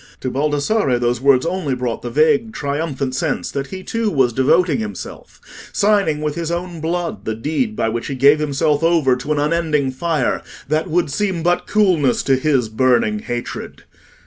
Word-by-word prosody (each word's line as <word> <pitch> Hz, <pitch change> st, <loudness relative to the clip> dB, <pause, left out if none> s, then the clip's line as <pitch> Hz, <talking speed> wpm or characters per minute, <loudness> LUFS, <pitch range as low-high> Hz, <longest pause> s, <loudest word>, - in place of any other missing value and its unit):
To 130 Hz, -, -2 dB
Baldassarre 145 Hz, -, +1 dB
those 120 Hz, 0 st, 0 dB
words 135 Hz, -2 st, +4 dB
only 170 Hz, -6 st, -1 dB
brought 125 Hz, -2 st, -3 dB
the 120 Hz, -, -5 dB
vague 215 Hz, -, +2 dB
triumphant 140 Hz, -4 st, -3 dB
sense 130 Hz, -, -2 dB
that 140 Hz, 0 st, -3 dB
he 185 Hz, +5 st, -8 dB
too 230 Hz, +1 st, -1 dB
was 130 Hz, -, +2 dB
devoting 145 Hz, +3 st, +3 dB
himself—signing 155 Hz, -, -2 dB
with 150 Hz, -1 st, -1 dB
his 165 Hz, +1 st, -4 dB
own 170 Hz, -1 st, -4 dB
blood 170 Hz, +1 st, -3 dB
the 110 Hz, -, -2 dB
deed 160 Hz, -, -2 dB
by 115 Hz, -, 0 dB
which 115 Hz, +1 st, -3 dB
he 140 Hz, -, -3 dB
gave 140 Hz, +3 st, +5 dB
himself 145 Hz, 0 st, +1 dB
over 165 Hz, -6 st, +3 dB
to 125 Hz, +4 st, -5 dB
an 150 Hz, -, +1 dB
unending 150 Hz, -2 st, +1 dB
fire, 150 Hz, 0 st, -1 dB, 0.3 s
that 155 Hz, +3 st, 0 dB
would 170 Hz, -3 st, +1 dB
seem 190 Hz, -2 st, -1 dB
but 175 Hz, +1 st, +1 dB
coolness 180 Hz, -, +2 dB
to 135 Hz, -, +3 dB
his 130 Hz, -3 st, +1 dB
burning 130 Hz, -, +2 dB
hatred. 120 Hz, -, -6 dB
150 Hz, 175 wpm, -19 LUFS, 130-170 Hz, 0.3 s, gave